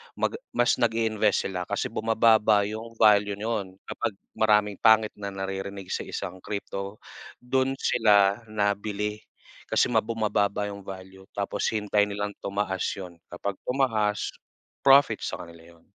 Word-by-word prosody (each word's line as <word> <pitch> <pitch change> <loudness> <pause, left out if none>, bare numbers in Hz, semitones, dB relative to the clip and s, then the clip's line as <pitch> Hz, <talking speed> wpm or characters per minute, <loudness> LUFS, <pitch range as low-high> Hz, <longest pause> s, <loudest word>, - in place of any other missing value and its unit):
mag 445 - -1 0.2
mas 120 - +3
nag-iinvest 110 -4 +1
sila 90 -1 -4
kasi - - -2
bumababa 110 -2 +4
yung 110 +3 -6
value 105 -2 +4
no'n, 105 -3 -3
kapag 110 - -4 0.2
maraming 105 -2 +3
pangit 110 -1 +5
na 100 - -4
naririnig 95 0 -5
sa - - -3
isang 95 - -5
crypto. 100 0 -5 0.5
Do'n 130 +1 +1
sila 105 -5 +3
na 105 -1 +1
bili 105 +1 -3 0.5
kasi - - +2
ma 115 - +4
bumababa 105 -2 0
yung 100 - -8
value 95 0 -10
tapos 100 0 -1
hinihintay 105 -1 +1
nilang 105 0 -3
tumaas 100 -2 -2
yun. 90 -3 -9
Kapag 95 +3 -5
tumaas 110 -6 +1 0.5
profit 140 +1 +5
sa - - -4
kanila 85 0 -15
yun. 85 - -26
105 Hz, 140 wpm, -26 LUFS, 100-110 Hz, 0.5 s, pangit